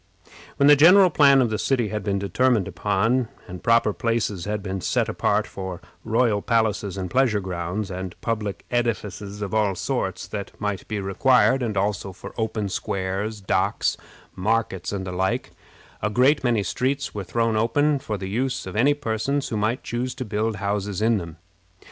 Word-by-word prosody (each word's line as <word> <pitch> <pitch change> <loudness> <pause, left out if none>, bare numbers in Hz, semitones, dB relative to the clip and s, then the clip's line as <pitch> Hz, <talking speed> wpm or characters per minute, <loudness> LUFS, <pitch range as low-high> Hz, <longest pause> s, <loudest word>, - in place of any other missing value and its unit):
When 140 - +4
the 145 +1 +8
general 180 +5 +7
plan 140 -3 +6
of 115 - -1
the 110 - -1
city 120 -6 +1
had 105 0 -3
been 100 -1 0
determined 105 +2 +1
upon, 105 +6 +1 0.2
and 90 -2 -8
proper 115 -2 +3
places 110 -6 -1
had 105 -1 -3
been 95 -1 -4
set - - +1
apart 105 +1 +1
for 95 -4 -6 0.2
royal 115 -2 +2
palaces 105 -4 0
and 95 -1 -3
pleasure 115 +1 +2
grounds, 95 +2 -4
and 95 -1 -6
public 105 -3 -3
edifices 105 -4 -2
of 100 - -5
all 105 -3 +2
sorts 95 -3 -2
that 100 -2 -6
might 105 -2 -3
be 110 -2 -3
required, 130 +7 +3
and 110 -5 -2
also 100 -1 -1
for 90 - -10
open 110 -2 -2
squares, 100 +3 -3
docks, 95 - +1 0.4
markets, 105 -2 -1
and 95 -2 -3
the 95 - -4
like, 95 +1 -1 0.5
a 105 - 0
great 130 +7 +3
many 115 -5 +2
streets 135 +5 -1
were 100 - -4
thrown 115 +4 0
open 145 +7 +2
for 110 -5 -4
the 95 0 -5
use 125 +6 -2
of 95 - -7
any 140 +6 +4
persons 140 +2 -2
who - - -3
might 110 +4 -1
choose 125 +2 -3
to 130 - -5
build 110 +1 -1
houses 100 +1 -2
in 115 -1 +3
them. 85 -2 -8
105 Hz, 180 wpm, -24 LUFS, 95-120 Hz, 0.5 s, the